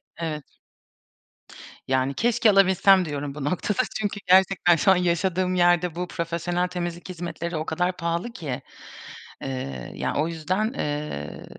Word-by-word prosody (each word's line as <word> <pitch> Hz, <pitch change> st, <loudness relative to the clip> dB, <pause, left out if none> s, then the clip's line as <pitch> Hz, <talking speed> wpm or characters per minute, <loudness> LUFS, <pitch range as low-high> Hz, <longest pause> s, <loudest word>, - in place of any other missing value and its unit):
Evet. 155 Hz, -3 st, -4 dB, 1.4 s
Yani, 130 Hz, +1 st, +1 dB
keşke 230 Hz, -, +3 dB
alabilsem 195 Hz, -1 st, +5 dB
diyorum 145 Hz, -2 st, -4 dB
bu 150 Hz, -, -5 dB
noktada. 180 Hz, +6 st, 0 dB, 0.2 s
Çünkü 205 Hz, -1 st, -2 dB
gerçekten 185 Hz, -1 st, +5 dB
şu 180 Hz, +4 st, +4 dB
an -, -, +6 dB
yaşadığım 180 Hz, +1 st, +1 dB
yerde 175 Hz, -1 st, +3 dB
bu 180 Hz, +1 st, -3 dB
profesyonel 170 Hz, +1 st, -2 dB
temizlik 175 Hz, 0 st, -5 dB
hizmetleri 170 Hz, -1 st, -4 dB
o 155 Hz, -, -3 dB
kadar 180 Hz, +2 st, -1 dB
pahalı 170 Hz, +5 st, -2 dB
ki. 145 Hz, -, -5 dB, 0.8 s
Eee, 70 Hz, -, -5 dB
ya, -, -, -2 dB
o 155 Hz, +3 st, +1 dB
yüzden, 175 Hz, +6 st, -1 dB
ııı, 145 Hz, -, -4 dB
175 Hz, 135 wpm, -25 LUFS, 155-185 Hz, 1.4 s, an